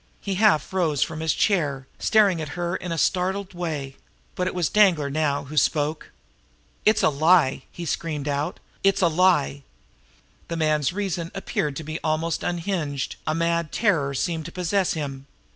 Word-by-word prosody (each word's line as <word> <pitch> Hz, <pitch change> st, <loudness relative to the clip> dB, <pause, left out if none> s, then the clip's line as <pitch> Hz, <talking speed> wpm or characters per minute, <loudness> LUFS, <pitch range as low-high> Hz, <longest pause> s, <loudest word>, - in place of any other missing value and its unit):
He 200 Hz, -, -3 dB
half 190 Hz, -6 st, +3 dB
rose 160 Hz, -7 st, +2 dB
from 160 Hz, -1 st, -5 dB
his 160 Hz, -1 st, +1 dB
chair, 145 Hz, -10 st, +1 dB
staring 200 Hz, -6 st, +3 dB
at 155 Hz, -, -5 dB
her 175 Hz, 0 st, -1 dB
in 180 Hz, -, -5 dB
a 165 Hz, -, -2 dB
startled 190 Hz, +3 st, 0 dB
way 150 Hz, -6 st, -4 dB, 0.4 s
but 180 Hz, -, -1 dB
it -, -, -3 dB
was 175 Hz, -3 st, +1 dB
Danglar 175 Hz, -9 st, +3 dB
now 145 Hz, -1 st, 0 dB
who 145 Hz, +3 st, -9 dB
spoke. 150 Hz, +2 st, +1 dB, 0.8 s
"It's 215 Hz, 0 st, +4 dB
a -, -, +6 dB
lie!" 155 Hz, -2 st, +3 dB
he 175 Hz, -, -7 dB
screamed 150 Hz, -2 st, -3 dB
out. 145 Hz, +4 st, -2 dB, 0.2 s
"It's 195 Hz, -1 st, +3 dB
a -, -, +6 dB
lie!" 160 Hz, -, +2 dB, 0.9 s
The 170 Hz, -, -4 dB
man's 155 Hz, -2 st, +1 dB
reason 180 Hz, -4 st, -3 dB
appeared 150 Hz, -6 st, -2 dB
to 160 Hz, -, -5 dB
be 155 Hz, +1 st, -5 dB
almost 160 Hz, +1 st, 0 dB
unhinged; 170 Hz, -6 st, -2 dB
a 155 Hz, -, +1 dB
mad 170 Hz, -1 st, 0 dB
terror 160 Hz, -11 st, +1 dB
seemed 160 Hz, +2 st, -2 dB
to 170 Hz, -, -7 dB
possess 185 Hz, +2 st, 0 dB
him. 140 Hz, -3 st, -5 dB
165 Hz, 170 wpm, -24 LUFS, 150-180 Hz, 0.9 s, a